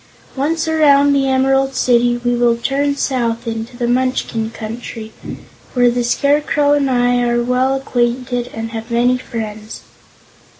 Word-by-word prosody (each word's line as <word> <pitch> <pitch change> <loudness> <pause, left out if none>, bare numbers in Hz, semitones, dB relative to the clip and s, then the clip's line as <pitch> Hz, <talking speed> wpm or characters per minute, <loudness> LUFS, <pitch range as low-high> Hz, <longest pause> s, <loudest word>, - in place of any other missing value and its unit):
Once 320 +4 -1
around 285 -3 +4
the 270 -1 +1
Emerald 270 0 +2
City 240 -1 +2
we 245 0 +1
will 240 -1 +2
turn 280 +3 0
south 235 -4 -1
into 230 +2 -5
the 240 -1 -1
Munchkin 245 -3 -1
Country, 225 0 -7 0.6
where 245 -1 +4
the 245 0 -1
Scarecrow 285 +4 +2
and 285 -2 +1
I 245 -1 +2
are 240 0 +1
well 255 +2 +1
acquainted 245 -1 -1
and 225 0 -6
have 225 0 -6
many 245 +2 +2
friends." 220 -3 -7
245 Hz, 140 wpm, -17 LUFS, 235-270 Hz, 0.6 s, around